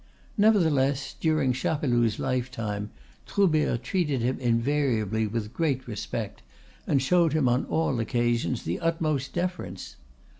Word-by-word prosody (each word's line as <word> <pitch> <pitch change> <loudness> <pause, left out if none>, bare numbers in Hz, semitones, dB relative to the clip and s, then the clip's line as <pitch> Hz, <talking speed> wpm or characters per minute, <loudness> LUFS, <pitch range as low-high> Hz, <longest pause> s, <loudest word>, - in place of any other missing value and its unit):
Nevertheless, 155 - +3
during 155 -5 +2
Chapeloud's 120 -5 +1
lifetime 115 -5 -2 0.4
Troubert 155 - +2
treated 150 -5 0
him 130 +2 0
invariably 115 -3 +1
with 110 +1 -4
great 135 -6 -1
respect, 105 -1 -5 0.5
and 140 - +3
showed 165 +3 +3
him 155 -5 +2
on 125 +2 +2
all 160 -6 0
occasions 120 -4 0
the 85 +3 -2
utmost 155 -5 -1
deference. 175 - -4
130 Hz, 115 wpm, -27 LUFS, 115-155 Hz, 0.5 s, Nevertheless